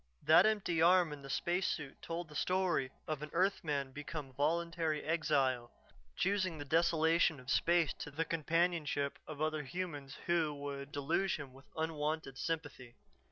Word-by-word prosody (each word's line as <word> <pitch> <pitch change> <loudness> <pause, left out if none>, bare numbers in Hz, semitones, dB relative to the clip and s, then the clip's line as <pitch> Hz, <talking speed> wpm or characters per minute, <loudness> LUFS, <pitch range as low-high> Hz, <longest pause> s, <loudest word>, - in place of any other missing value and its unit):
That 175 +6 +7
empty 190 -7 +1
arm 175 -2 +5
in 145 - -9
the 135 - -10
spacesuit 175 -3 -1
told 170 0 -4
the 150 - -13
story 180 -6 +1 0.2
of 155 -2 -2
an 150 - -5
earthman 150 -8 0
become 145 -1 -6
voluntary 160 +2 0
exile, 135 -6 +1 0.5
choosing 185 -3 +1
the 145 - -6
desolation 160 0 +3
of 125 +2 -5
space 170 -1 +3
to - - -5
the 160 +3 -2
companionship 165 -3 0
of 155 -1 -4
other 155 -1 0
humans 145 -3 -5
who 165 -4 +1
would 140 0 -6
deluge 170 +7 0
him 140 -4 -8
with 135 +1 -16
unwonted 155 -3 -2
sympathy. 145 -7 -4
155 Hz, 150 wpm, -35 LUFS, 145-170 Hz, 0.5 s, That